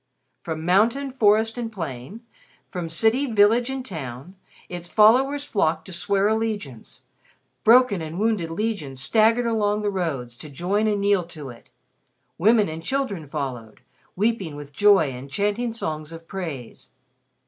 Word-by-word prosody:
From 160 Hz, +1 st, -5 dB
mountain, 230 Hz, +10 st, +2 dB
forest 225 Hz, -1 st, +2 dB
and 230 Hz, -2 st, -4 dB
plain, 165 Hz, -, -7 dB, 0.5 s
from 175 Hz, -4 st, -4 dB
city, 225 Hz, -, +1 dB
village 225 Hz, +4 st, +4 dB
and 265 Hz, -1 st, -4 dB
town, 140 Hz, -, -7 dB, 0.3 s
its 175 Hz, -1 st, -6 dB
followers 260 Hz, +8 st, +4 dB
flocked 165 Hz, -, 0 dB
to 190 Hz, -, -8 dB
swear 195 Hz, +3 st, +1 dB
allegiance; 215 Hz, -, -3 dB, 0.6 s
broken 235 Hz, -5 st, +5 dB
and 160 Hz, +1 st, -6 dB
wounded 210 Hz, -5 st, 0 dB
legions 165 Hz, -8 st, -3 dB
staggered 225 Hz, -, +3 dB
along 210 Hz, -2 st, 0 dB
the 205 Hz, -, 0 dB
roads 140 Hz, -11 st, -3 dB
to 155 Hz, -, -10 dB
join 190 Hz, +9 st, 0 dB
and 205 Hz, -2 st, 0 dB
kneel 200 Hz, -2 st, +2 dB
to 155 Hz, -5 st, -9 dB
it; 120 Hz, -1 st, -14 dB, 0.7 s
women 215 Hz, +3 st, +4 dB
and 160 Hz, +1 st, -6 dB
children 200 Hz, -, -2 dB
followed, 130 Hz, -7 st, -6 dB, 0.3 s
weeping 200 Hz, -6 st, -1 dB
with 145 Hz, -1 st, -10 dB
joy 195 Hz, -6 st, +4 dB
and 130 Hz, +2 st, -9 dB
chanting 205 Hz, -, -1 dB
songs 155 Hz, -8 st, -4 dB
of 165 Hz, 0 st, -11 dB
praise. 160 Hz, -12 st, -7 dB
195 Hz, 145 wpm, -23 LUFS, 155-225 Hz, 0.7 s, broken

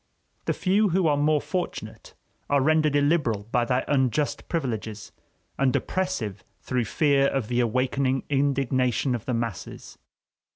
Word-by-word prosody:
The -, -, +1 dB
few 200 Hz, +2 st, +2 dB
who 180 Hz, +1 st, +1 dB
are 150 Hz, -2 st, +3 dB
more 150 Hz, +1 st, +2 dB
fortunate 180 Hz, +4 st, -5 dB, 0.3 s
are 145 Hz, -, +3 dB
rendered 155 Hz, +1 st, +3 dB
illiberal 145 Hz, -8 st, +2 dB
by 120 Hz, -1 st, +2 dB
their 125 Hz, +2 st, 0 dB
unjust 140 Hz, +1 st, 0 dB
privileges, 110 Hz, -9 st, -3 dB, 0.5 s
and 135 Hz, -2 st, +2 dB
oppressive 180 Hz, -, -2 dB, 0.2 s
through 125 Hz, +5 st, -1 dB
fear 140 Hz, +3 st, +3 dB
of 135 Hz, -6 st, -2 dB
the 120 Hz, 0 st, +1 dB
awakening 130 Hz, +3 st, +1 dB
indignation 135 Hz, -2 st, +1 dB
of 120 Hz, -3 st, -4 dB
the 125 Hz, -, -1 dB
masses. 115 Hz, -5 st, -5 dB
135 Hz, 135 wpm, -25 LUFS, 120-150 Hz, 0.5 s, are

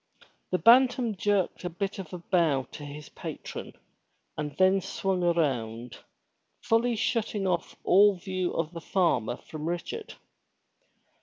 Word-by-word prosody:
'* -, -, -39 dB
The 185 Hz, -, +2 dB
Bantam 245 Hz, +3 st, +5 dB
jerked 195 Hz, -2 st, 0 dB
a 180 Hz, -, -2 dB
bit 195 Hz, +3 st, -4 dB
of 180 Hz, -5 st, -7 dB
a 180 Hz, -, -5 dB
bow 170 Hz, -6 st, +1 dB
to 150 Hz, -, -9 dB
his 145 Hz, 0 st, -9 dB
patron, -, -, -7 dB, 0.6 s
and 150 Hz, -1 st, -5 dB
then 190 Hz, +1 st, +4 dB
swung 190 Hz, 0 st, -2 dB
around, 125 Hz, -9 st, 0 dB, 0.7 s
fully 230 Hz, +1 st, +2 dB
shutting 220 Hz, -2 st, -1 dB
off 175 Hz, -3 st, -1 dB
all 200 Hz, +1 st, +6 dB
view 185 Hz, 0 st, -3 dB
of 165 Hz, -1 st, -1 dB
the 165 Hz, -, -7 dB
farmer 125 Hz, -, +1 dB
from 155 Hz, +1 st, -6 dB
Richard. 420 Hz, -, -5 dB
180 Hz, 140 wpm, -28 LUFS, 155-200 Hz, 0.7 s, all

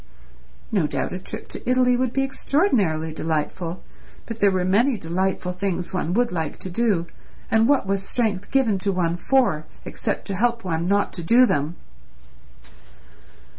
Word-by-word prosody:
No 185 Hz, -8 st, +2 dB
doubt -, -, -2 dB
a 180 Hz, -, -4 dB
trip 215 Hz, +4 st, -7 dB
to -, -, -6 dB
Italy 250 Hz, -1 st, +4 dB
would 255 Hz, -1 st, 0 dB
be 270 Hz, +2 st, +1 dB
extraordinarily 220 Hz, -, +1 dB
delightful, 165 Hz, +3 st, -3 dB, 0.4 s
but 230 Hz, -1 st, -7 dB
there 200 Hz, -, +5 dB
were 185 Hz, -2 st, 0 dB
many 225 Hz, +7 st, +3 dB
delightful 180 Hz, +1 st, -1 dB
things 180 Hz, -1 st, -3 dB
one 180 Hz, -2 st, -1 dB
would 240 Hz, +3 st, +2 dB
like 160 Hz, -4 st, -3 dB
to 185 Hz, -, -5 dB
do, 200 Hz, -4 st, +1 dB, 0.5 s
and 225 Hz, +2 st, +4 dB
what 285 Hz, -6 st, +3 dB
was 195 Hz, 0 st, 0 dB
strength 200 Hz, -2 st, -1 dB
given 235 Hz, -8 st, +2 dB
to 200 Hz, +1 st, 0 dB
one 175 Hz, -3 st, 0 dB
for 175 Hz, -6 st, +1 dB, 0.2 s
except -, -, -3 dB
to 195 Hz, -, -2 dB
help 235 Hz, +3 st, +1 dB
one 170 Hz, -2 st, -1 dB
not 200 Hz, +1 st, +1 dB
to 175 Hz, -, -3 dB
do 235 Hz, +9 st, +6 dB
them? 150 Hz, -, -1 dB
195 Hz, 165 wpm, -23 LUFS, 175-235 Hz, 0.5 s, do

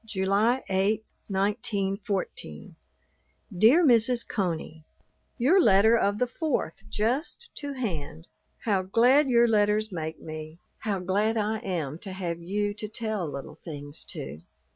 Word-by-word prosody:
July 215 Hz, +4 st, +1 dB
8, 200 Hz, +3 st, +1 dB, 0.2 s
1914. 195 Hz, -, -2 dB, 0.8 s
DEAR 240 Hz, -, +6 dB
MRS. 240 Hz, -1 st, +4 dB
CONEY, 165 Hz, -5 st, -3 dB, 0.5 s
Your 300 Hz, +10 st, +5 dB
letter 220 Hz, -, +5 dB
of 205 Hz, -3 st, +1 dB
the 250 Hz, -, +2 dB
4th 240 Hz, -, -3 dB
just 270 Hz, -, -2 dB
to 285 Hz, -1 st, -6 dB
hand. 165 Hz, -, -4 dB, 0.4 s
How 200 Hz, -4 st, +2 dB
glad 245 Hz, +9 st, +4 dB
your 235 Hz, -1 st, +5 dB
letters 215 Hz, 0 st, +2 dB
make 160 Hz, -3 st, -4 dB
me; 155 Hz, 0 st, -8 dB, 0.2 s
how 205 Hz, -3 st, -1 dB
glad 205 Hz, +5 st, 0 dB
I 215 Hz, +1 st, 0 dB
am 170 Hz, -, -3 dB
to 190 Hz, 0 st, -7 dB
have 170 Hz, -3 st, -4 dB
you 205 Hz, +4 st, -1 dB
to 215 Hz, +1 st, -6 dB
tell 215 Hz, -4 st, -3 dB
little 140 Hz, +2 st, -8 dB
things 145 Hz, -3 st, -7 dB
to. 70 Hz, +4 st, -7 dB
205 Hz, 130 wpm, -27 LUFS, 180-230 Hz, 0.8 s, DEAR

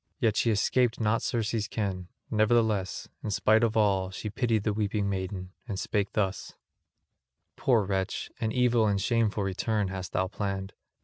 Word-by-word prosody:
Yet 115 Hz, -6 st, +2 dB
she 115 Hz, -, +2 dB
escaped 120 Hz, +3 st, +2 dB
not 110 Hz, 0 st, +2 dB
Circe's 115 Hz, -2 st, -1 dB
ken; 95 Hz, -5 st, -3 dB, 0.2 s
nevertheless, 110 Hz, -3 st, +1 dB, 0.2 s
in -, -, -3 dB
spite 110 Hz, +2 st, +3 dB
of 115 Hz, -1 st, +1 dB
all, 95 Hz, -3 st, +2 dB
she 100 Hz, +3 st, -5 dB
pitied 115 Hz, -3 st, +1 dB
the 105 Hz, -, +1 dB
weeping 105 Hz, -1 st, 0 dB
maiden, 95 Hz, -1 st, -3 dB, 0.2 s
and 100 Hz, -5 st, -3 dB
spake 100 Hz, 0 st, -1 dB
thus: 100 Hz, -3 st, -2 dB, 1.0 s
"Poor 120 Hz, -5 st, +3 dB
wretch, 95 Hz, 0 st, -2 dB
an 110 Hz, -1 st, -1 dB
evil 120 Hz, -2 st, +3 dB
and 100 Hz, -1 st, +1 dB
shameful 110 Hz, 0 st, +1 dB
return 100 Hz, +1 st, -1 dB
hast 95 Hz, -1 st, -6 dB
thou 95 Hz, -, +2 dB
planned. 95 Hz, 0 st, -4 dB
105 Hz, 160 wpm, -28 LUFS, 95-115 Hz, 1.0 s, spite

